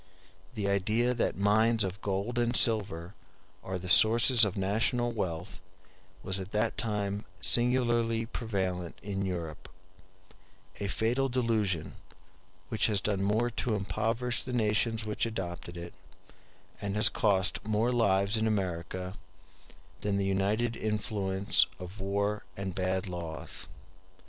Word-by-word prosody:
The 105 -3 -2
idea 110 +5 +1
that 120 - -1
mines 110 +3 +3
of 95 0 -4
gold 100 +5 -2
and 120 0 +1
silver 100 -7 +2 0.5
are 95 0 -3
the 90 0 -7
sources 115 +5 +7
of 100 -3 +2
national 110 +5 +1
wealth 95 -4 -4 0.6
was 95 0 -1
at 95 +1 -8
that 110 +2 +1
time 105 -2 -1 0.2
singularly 120 -1 +2
prevalent 95 -7 -3
in 100 -1 -3
Europe; 85 -5 -5 1.1
a 100 - -2
fatal 120 +7 0
delusion, 110 -10 0 0.8
which - - +2
has 105 -3 +2
done 100 0 -1
more 110 +5 +1
to 115 -1 -1
impoverish 115 +4 -1
the 125 - -6
nations 110 0 +1
which 105 +2 0
adopted 85 -5 -6
it, 85 0 -8 0.9
and 100 -1 -3
has 105 - +5
cost 95 -3 +1
more 110 +3 +1
lives 100 -3 +2
in 110 0 +1
America, 90 -2 -2 0.9
than 100 -1 -1
the 100 - 0
united 105 +5 0
influence 105 -3 +1
of 90 +3 -9
war 100 +2 -1
and 95 -1 -4
bad 95 +2 -1
laws. 85 -3 -5
105 Hz, 130 wpm, -30 LUFS, 95-115 Hz, 1.1 s, sources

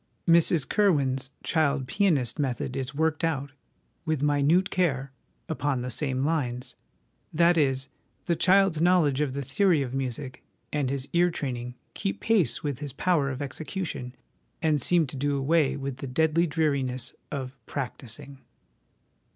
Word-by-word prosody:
Mrs 165 -3 +5
Curwen's 140 -10 +2
Child 145 -4 +1
Pianist^ 155 - +1
method 130 -2 -2
is 135 +1 -4
worked 160 +1 0
out, 145 -4 -1 0.5
with 155 -4 -1
minute 150 +6 +3
care, 140 -7 0 0.4
upon 145 -5 -1
the 125 - -3
same 130 +1 -1
lines; 125 -5 -2 0.6
that 170 +2 +4
is, 135 -4 +1 0.4
the 170 - +1
child's 185 -1 +3
knowledge 165 -6 +3
of 140 -3 0
the 140 +1 -3
theory 160 +2 +2
of 125 -1 -6
music 130 0 -4 0.3
and 145 -3 0
his 135 0 -3
ear 175 +1 +4
training 125 -6 -4 0.2
keep 195 -1 -3
pace 195 - +1
with 140 -4 -2
his 145 -3 -6
power 150 -2 +1
of 140 +1 -4
execution, 140 -3 -5 0.4
and 155 -3 +1
seem 170 +4 +3
to 135 - -8
do 140 +1 0
away 145 +1 +2
with 135 -2 -4
the 135 - -6
deadly 160 +5 +2
dreariness 140 -5 0 0.2
of 130 -2 -4
' - - -45
practising.' 130 0 -5
145 Hz, 150 wpm, -27 LUFS, 130-165 Hz, 0.6 s, Mrs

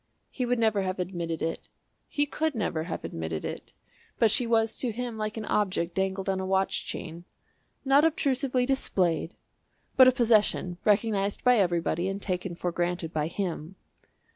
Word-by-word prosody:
He 250 -2 -2
would 245 +1 +1
never 220 -3 +2
have 185 0 -2
admitted 175 -3 -3
it 165 0 -4 0.4
he 290 - 0
could 305 0 -2
never 165 -7 -1
have 170 - -5
admitted 80 -1 -4
it, - - -6 0.5
but 225 -2 +4
she 235 +2 +3
was 225 -1 +2
to 250 - -1
him 240 +1 -4
like 215 0 -3
an 220 - -4
object 185 -5 0
dangled 190 +1 -1
on 190 -1 0
a - - -2
watch 190 0 0
chain 170 0 -6 0.6
not 275 +2 +5
obtrusively 270 -5 +1
displayed 180 -11 0 0.6
but 260 -1 +9
a - - +8
possession 215 -7 +2
recognised 205 -1 +1
by 250 -1 +5
everybody 175 -1 +1
and 195 +1 -3
taken 180 -2 -3
for 175 +1 -2
granted 175 -1 -2
by 155 -1 0
him. 175 -1 -4
195 Hz, 165 wpm, -28 LUFS, 175-235 Hz, 0.6 s, but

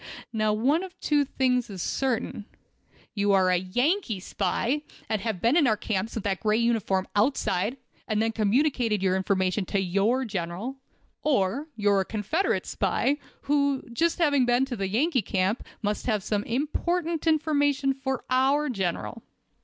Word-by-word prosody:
Now, 215 -1 +1
one 260 +10 +2
of 375 -1 -9
two 295 -1 +2
things 250 -3 0
is 195 -2 -7
certain: 230 -1 -2 0.7
you 205 -1 +2
are 185 -1 +4
a 180 - +4
Yankee 245 - 0
spy, 255 +8 -1 0.3
and 215 -2 -1
have 215 -3 -2
been 235 - +3
in 320 -6 +5
our 215 -2 +2
camps 210 0 -2
with 225 - -3
that 195 -2 -1
gray 215 0 +2
uniform 225 -5 +1
outside, 210 -1 +1 0.3
and 215 -2 0
then 225 +1 +1
communicated 225 -1 +1
your 185 -1 +2
information 190 0 0
to 200 - -1
your 200 +8 +1
General, 200 +5 -4 0.4
or 270 +1 +1
you 205 -2 +2
are 200 - +4
a - - -3
Confederate 225 - -1
spy, 285 +2 0 0.2
who, 280 -1 +2
having 240 - -14
just 335 +7 +1
been 315 -4 +2 0.2
in 245 +2 +3
the 235 -8 -3
Yankee 260 - +2
camp, 195 +2 0 0.2
must 210 +3 -2
have 215 -5 0 0.2
important 325 +6 -1
information 290 -3 +2
for 265 -1 -4
our 275 +3 +3
General. 195 +1 -3
230 Hz, 160 wpm, -26 LUFS, 200-280 Hz, 0.7 s, in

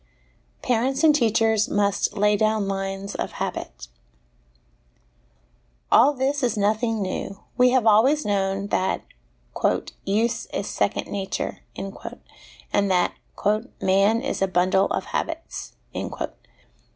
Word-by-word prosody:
Parents 255 +4 +1
and 310 -2 +7
Teachers 225 -4 +2
must 200 +1 +1
lay 210 +1 +4
down 215 -1 +1
Lines 195 0 -3
of - - -4
Habit. - - -5 2.0
All 270 +5 +7
this 275 +2 0
is 240 -4 0
nothing 215 +1 +1
new; 195 +1 -4 0.2
we 250 0 +5
have 250 -2 +2
always 240 +8 +4
known 195 -1 0
that 185 - 0 0.6
' - - -1
use 220 +4 0
is - - -4
second - - -1
nature/ 195 -1 -3 0.2
and 195 0 -5
that 180 -1 +2 0.3
' 215 +5 0
man 200 +4 +3
is - - -2
a 195 - +3
bundle 185 +2 +2
of - - -2
habits.' 330 0 -4
210 Hz, 115 wpm, -24 LUFS, 195-235 Hz, 2.0 s, and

